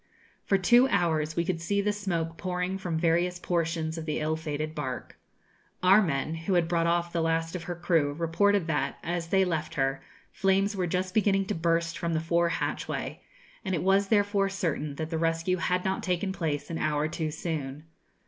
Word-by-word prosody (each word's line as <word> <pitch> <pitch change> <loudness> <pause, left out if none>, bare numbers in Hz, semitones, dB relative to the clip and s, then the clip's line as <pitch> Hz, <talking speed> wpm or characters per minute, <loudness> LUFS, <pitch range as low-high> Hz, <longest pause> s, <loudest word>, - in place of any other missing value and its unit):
For 195 - +3
two 240 +7 +5
hours 160 -7 +1
we 170 - +1
could 175 -2 -2
see 200 +4 0
the 205 +1 +1
smoke 170 -5 -2
pouring 180 +1 -2
from 175 -4 -2
various 175 +2 +2
portions 165 -2 -1
of 160 - -7
the 150 - -1
ill 155 +1 0
fated 155 -1 -4
barque. 130 -6 -5 0.7
Our 195 +3 +7
men, 155 -4 -1
who 165 +4 -1
had 170 -2 +3
brought 170 -1 +1
off 170 0 0
the 170 - +1
last 165 +1 0
of 170 - -5
her 175 - -4
crew, 165 -4 +1
reported 170 +4 +2
that, 150 -4 -1
as 170 0 -2
they 190 +2 +3
left 160 -4 -2
her, 135 -1 0 0.3
flames 195 +2 +1
were 185 -2 0
just 185 +1 -1
beginning 195 -2 +3
to 210 - -2
burst 165 -1 0
from 170 -1 -1
the - - +2
fore 170 +1 +1
hatchway; - - -3 0.4
and 190 -2 -1
it 160 - -2
was 195 +1 +3
therefore 205 -1 +2
certain 155 -7 -2
that 160 +2 -4
the 160 - -1
rescue 165 +2 +1
had 180 0 0
not 190 0 0
taken 185 +1 -1
place 160 -5 -3
an 165 - -3
hour 150 0 +1
too 160 0 -3
soon. 150 -3 -4
170 Hz, 195 wpm, -28 LUFS, 160-190 Hz, 0.7 s, Our